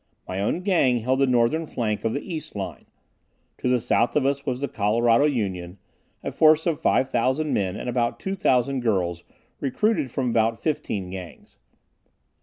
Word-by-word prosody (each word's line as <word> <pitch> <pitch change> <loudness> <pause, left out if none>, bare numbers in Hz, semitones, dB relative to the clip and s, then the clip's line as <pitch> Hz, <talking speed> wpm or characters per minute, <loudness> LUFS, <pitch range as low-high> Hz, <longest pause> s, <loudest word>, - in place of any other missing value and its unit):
My 95 +1 -4
own 135 - 0
Gang 170 -10 +3
held 130 +3 0
the 135 - +4
northern 125 +6 +2
flank 110 -6 -2
of 115 - 0
the 140 - -4
east 155 -4 -6
line. 90 -9 -6 0.7
To 125 - -1
the 125 -1 +3
south 120 0 +1
of 145 -3 +2
us 140 +1 -1
was 125 -2 -1
the 140 - -2
Colorado 115 +5 +2
Union, 95 -10 -2 0.5
a - - -3
force 155 0 +4
of 165 -4 0
5,000 130 +4 +1
men 95 -2 0
and - - -6
about 120 -1 0
2,000 140 -9 +1
girls 90 -7 -1 0.4
recruited 140 - 0
from 125 0 -1
about 115 0 +1
fifteen 100 - -2
Gangs. 90 -2 -10
125 Hz, 165 wpm, -24 LUFS, 105-140 Hz, 0.7 s, the